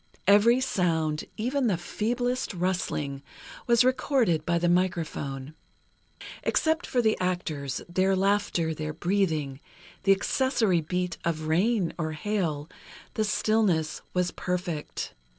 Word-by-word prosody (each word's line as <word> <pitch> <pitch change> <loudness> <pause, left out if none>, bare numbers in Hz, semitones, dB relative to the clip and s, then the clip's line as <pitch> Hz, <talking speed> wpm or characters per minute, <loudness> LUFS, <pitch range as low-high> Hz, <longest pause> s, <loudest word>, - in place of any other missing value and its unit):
Every 210 +5 +6
sound, 160 -10 0
even 255 +4 0
the 195 -6 +1
feeblest 245 +5 -2
rustling, 170 -6 -2 0.5
was 235 0 +5
recorded 255 - +2
by 170 0 +2
the 175 +1 +1
microphone. 160 -6 -1 0.9
Except 320 +2 +1
for 245 -2 +1
the 220 -1 +3
actors, 160 -7 -2
their 185 +2 +2
laughter, 195 -4 +1
their 155 0 -4
breathing, 160 -6 0 0.4
the 195 - +3
accessory 215 - +2
beat 180 +2 -2
of 155 -2 -2
rain, 185 +3 +2
or 155 -1 -2
hail, 155 -4 -2 0.5
the 215 - 0
stillness 205 -7 +1
was 180 -1 0
perfect. 180 -4 -4
180 Hz, 115 wpm, -27 LUFS, 160-215 Hz, 0.9 s, Every